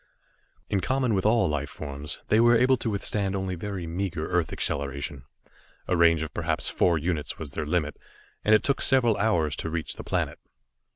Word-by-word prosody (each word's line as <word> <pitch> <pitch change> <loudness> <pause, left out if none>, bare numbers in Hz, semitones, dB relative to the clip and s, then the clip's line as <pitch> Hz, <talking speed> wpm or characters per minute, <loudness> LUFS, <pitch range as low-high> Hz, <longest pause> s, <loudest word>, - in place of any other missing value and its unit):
In 100 - 0
common 130 +2 0
with 95 +1 +1
all 115 +1 +3
life 75 -2 -2
forms, 70 0 -6
they 110 - +4
were 120 0 +6
able 130 +3 +4
to 120 -2 -3
withstand 100 -1 0
only 95 -1 -2
very 95 0 -5
meager 85 -2 -3
earth 90 -2 +1
acceleration. 70 -1 -3 0.6
A 90 - +1
range 85 -2 +4
of 80 - -7
perhaps - - -1
four 85 -2 +2
units 80 -1 -2
was 75 -4 -6
their 75 +1 -4
limit, 75 -2 -1 0.5
and 110 - +5
it 110 - +2
took 140 - +1
several 125 -5 +4
hours 85 -9 +1
to 80 - -3
reach 80 -1 -4
the - - -7
planet. - - -2
90 Hz, 185 wpm, -26 LUFS, 75-105 Hz, 0.6 s, were